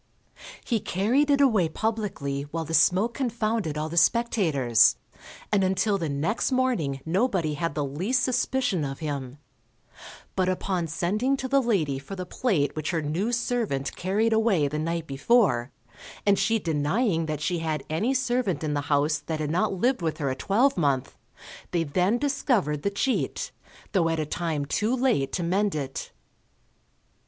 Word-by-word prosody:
He 230 -3 +1
carried 235 +12 +1
it 285 0 +4
away 215 - +3
publicly, 160 -10 -3
while 165 +1 -3
the 165 - -6
smoke 185 +9 +4
confounded 225 - -1
all 155 +1 -2
the 165 +2 -6
spectators, 160 - +3 0.6
and 205 -2 +3
until 190 +2 +1
the 165 -3 -2
next 155 - -1
morning 235 - 0
nobody 180 -3 +1
had 160 0 -3
the 145 -2 0
least 185 - 0
suspicion 255 - 0
of 135 -1 -4
him; 140 -4 -5 1.0
but 185 -1 +1
upon 185 -2 -1
sending 210 - 0
to 260 - -3
the 275 +1 +3
lady 165 - 0
for 170 +8 -8
the 185 -1 -5
plate 180 - 0
which 155 0 -3
her 165 -3 -1
new 175 +10 -1
servant 235 - -1
carried 210 +5 +1
away 220 -9 +3
the 150 +2 -3
night 165 +1 -2
before, 140 - +2 0.5
and 200 -1 +4
she 225 +1 +2
denying 165 - 0
that 155 -2 -3
she 165 +3 -1
had 155 -3 -2
any 200 +11 0
servant 245 - 0
in 150 -1 -1
the 145 - 0
house 150 +1 +2
that 155 +1 -4
had 150 -1 -2
not 200 +6 +1
lived 240 +5 0
with 160 -2 -1
her 140 -3 -1
a - - -2
twelvemonth, 170 - +1 0.5
they 170 -2 0
then 180 +9 +1
discovered 245 - 0
the 200 - 0
cheat, 200 +6 -1 0.4
though 175 -5 +2
at 165 -1 -1
a 155 - -1
time 155 -2 -2
too 215 - 0
late 240 - +1
to 180 - -2
mend 195 +2 +1
it. 135 -3 -4
175 Hz, 165 wpm, -26 LUFS, 150-225 Hz, 1.0 s, it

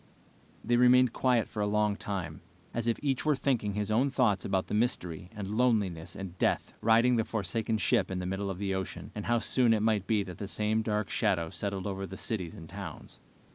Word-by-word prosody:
They 120 +1 +2
remained 125 0 +5
quiet 125 -4 +2
for 105 - -5
a 105 - +1
long 105 0 +2
time, 100 -4 -5 0.3
as 115 0 -2
if 115 - +2
each 135 -3 0
were 150 -1 +3
thinking 120 -7 0
his 105 0 -1
own 125 +6 +3
thoughts 120 -8 +2
about 95 -1 0
the - - -6
mystery 90 -7 -1
and 105 -2 -5
loneliness 100 -10 +1
and 95 -2 -7
death - - +1
riding 115 +3 +4
the 115 - +2
forsaken 110 +2 -1
ship 100 - +2
in 95 - -3
the 90 - -3
middle 95 +2 -2
of 95 - -4
the 100 0 -2
ocean, 95 -1 -5
and 105 - -5
how 120 0 +3
soon 115 0 +3
it 105 - 0
might 105 -4 +1
be 105 -3 +2
that 90 -3 -9
the 100 - -4
same 105 +2 0
dark 105 -2 -1
shadow 85 -3 +1
settled 100 -2 -3
over 95 -1 -3
the 95 - -8
cities 95 -7 -3
and 80 - -10
towns. 95 -3 -8
105 Hz, 215 wpm, -30 LUFS, 95-115 Hz, 0.3 s, remained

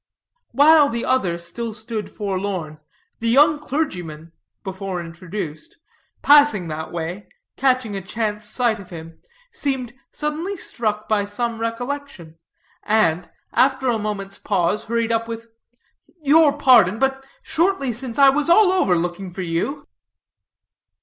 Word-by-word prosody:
While 290 +3 +6
the 235 0 -3
other 195 -10 +1
still 215 +7 -6
stood 220 0 -5
forlorn, 190 -6 -4 0.4
the 230 - -1
young 295 +5 +5
clergyman, 180 - -4 0.3
before 190 -1 -5
introduced, 170 -2 -7 0.5
passing 285 - +5
that 155 +1 -5
way, 175 +4 -5 0.3
catching 255 -5 +1
a 195 - -3
chance 210 +2 -3
sight 225 0 0
of 195 - -12
him, 165 -1 -10 0.3
seemed 265 - -3 0.2
suddenly 315 +6 -3
struck 215 -8 -3
by 210 -2 +1
some 230 +3 -3
recollection; 230 - -5 0.4
and, 180 -6 +1 0.2
after 265 -1 +2
a 230 -2 +1
moment's 200 -2 -5
pause, 200 +2 0
hurried 230 0 -1
up 230 0 0
with: 230 0 -7 0.7
"Your 300 +1 +6
pardon, 235 -9 +5
but 270 +1 0 0.2
shortly 335 -6 0
since 240 0 -6
I 275 -1 +7
was 295 +4 0
all 370 +2 +6
over 365 - +2
looking 175 +3 -3
for 185 +1 -6
you." 175 - -3
225 Hz, 130 wpm, -21 LUFS, 185-270 Hz, 0.7 s, I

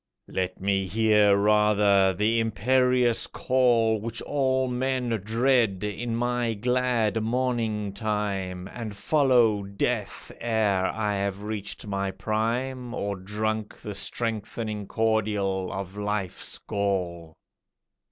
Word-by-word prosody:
Let 95 0 -2
me 95 0 0
hear 105 -1 +4
rather 105 -2 +4
the 105 +5 +1
imperious 125 +2 +2
call, 120 -4 +2
Which 115 +1 -4
all 130 -2 +1
men 125 0 -1
dread, 115 -3 +2
in 115 +3 -3
my 120 -1 0
glad 120 -1 +1
morning 115 -3 -1
time, 100 -4 -2
And 110 -4 -6
follow 120 -4 +3
death 100 +2 -3
ere 105 -5 +1
I 105 -2 -1
have 100 0 -2
reached 105 -1 -5
my 100 -1 -2
prime, 115 +6 -2
Or 100 0 -2
drunk 105 +3 -3
the 105 - -7
strengthening 105 0 -3
cordial 105 -4 0
of 95 0 -5
life's 105 -3 -3
gall. 90 -5 -2
110 Hz, 110 wpm, -26 LUFS, 100-120 Hz, -, hear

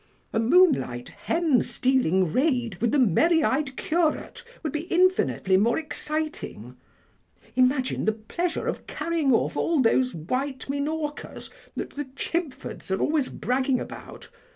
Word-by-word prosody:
A 225 - +2
moonlight 235 - +3
hen 325 -7 +1
stealing 240 -9 +1
raid 255 -6 +1
with 235 - +2
the 290 - +2
merry 310 - +4
eyed 270 -1 0
curate 325 -1 -1 0.2
would 305 - -3
be 310 +3 -3
infinitely 355 - +3
more 225 +5 +3
exciting; 310 0 -4 0.8
imagine 255 +1 +2
the 220 - +4
pleasure 280 +11 -3
of - - -4
carrying 330 -5 0
off 230 - +2
all 335 -3 +1
those 255 0 +3
white 255 - -3
minorcas 295 +2 -4 0.2
that - - -4
the 290 0 -5
Chibfords 325 - -4
are 190 - 0
always 300 -3 +1
bragging 260 +1 0
about. - - -9
270 Hz, 130 wpm, -26 LUFS, 240-315 Hz, 0.8 s, merry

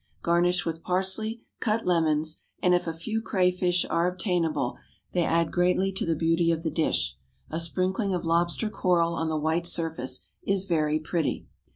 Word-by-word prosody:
Garnish 175 +1 +2
with 165 0 -3
parsley, 190 +6 -1 0.2
cut 225 -1 0
lemons, 160 -3 +1 0.2
and 180 - +3
if 175 -1 +1
a - - 0
few 215 +8 -3
crayfish 180 -3 +2
are 170 +1 +1
obtainable 175 - 0 0.4
they 175 - +1
add 165 0 +1
greatly 180 +2 +2
to 190 - -3
the 165 - +2
beauty 165 +1 +2
of 165 0 -1
the 160 - -1
dish. 65 - 0 0.3
A 160 - -2
sprinkling 185 +4 0
of 180 -2 -2
lobster 170 +6 +1
coral 170 -4 +2
on 165 -1 -1
the 155 - 0
white 160 +3 0
surface 160 -7 -1 0.2
is 195 -1 0
very 155 -4 +1
pretty. 160 0 -2
170 Hz, 170 wpm, -27 LUFS, 160-185 Hz, 0.4 s, and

